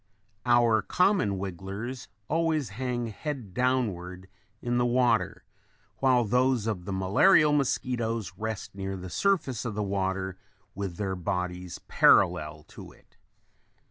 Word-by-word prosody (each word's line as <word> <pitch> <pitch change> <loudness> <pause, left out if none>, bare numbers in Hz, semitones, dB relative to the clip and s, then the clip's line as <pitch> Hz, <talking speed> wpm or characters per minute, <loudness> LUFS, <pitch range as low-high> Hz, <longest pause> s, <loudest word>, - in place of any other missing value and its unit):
Our 120 -2 +4
common 105 - +2
wigglers 100 +7 -6 0.2
always 160 -5 0
hang 120 +2 -3
head 120 - -6
downward 95 -8 -1 0.3
in 120 0 -1
the 120 - +2
water 115 -5 +1 0.5
while 130 -2 +3
those 125 +1 +2
of 100 -6 -3
the 100 - -4
malarial 145 - +4
mosquitoes 120 -7 -1
rest 110 +1 -5
near 95 0 -4
the 90 -1 -8
surface 160 - 0
of 115 -4 -4
the 105 - -1
water 95 -1 -2 0.3
with 95 -2 -4
their 95 -2 -2
bodies 90 0 -3
parallel 75 0 +3
to - - -11
it. - - -24
110 Hz, 125 wpm, -28 LUFS, 95-125 Hz, 0.5 s, Our